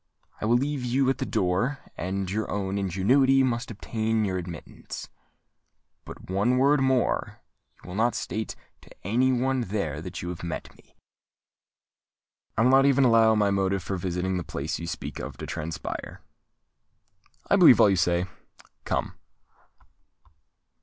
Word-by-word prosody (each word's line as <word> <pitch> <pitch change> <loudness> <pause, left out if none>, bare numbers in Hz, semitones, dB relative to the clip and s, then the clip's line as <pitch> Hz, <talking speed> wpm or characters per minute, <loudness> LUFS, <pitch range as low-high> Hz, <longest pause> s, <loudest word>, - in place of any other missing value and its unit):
I - - -1
will 115 +2 +3
leave 140 0 -2
you 130 +2 +2
at - - -4
the 130 - -2
door; 100 +9 0 0.2
and 95 +2 -3
your 110 +2 -2
own 100 -1 -2
ingenuity 130 +9 +3
must 120 -1 -1
obtain 110 0 -1
you 95 -2 -2
admittance. 85 -3 -7 1.0
But, - - -11
one 100 +7 +1
word 140 +2 +4
more: 130 -2 0 0.4
you - - -13
will 90 - -7
not 115 +3 +1
state 110 0 -4 0.3
to - - -18 0.2
any 125 +6 +2
one 130 +1 +1
there 95 -9 -3
that 90 +1 -7
you 90 - -4
have 90 - -6
met 85 - -6
me?" - - -24 1.6
"I 110 - +4
will 125 - +5
not 135 +1 +6
even 140 0 +4
allow 115 -2 +5
my 105 -2 +2
motive 95 -1 0
for 95 - -3
visiting 90 +1 -2
the 90 - -3
place 75 0 -4
you 85 - -6
speak - - -5
of - - -7
to - - -6
transpire." 75 -2 -5 1.3
"I - - +7
believe - - +7
all 100 - +6
you - - +3
say. 85 0 +1 0.6
Come!" - - -1
105 Hz, 155 wpm, -26 LUFS, 90-125 Hz, 1.6 s, I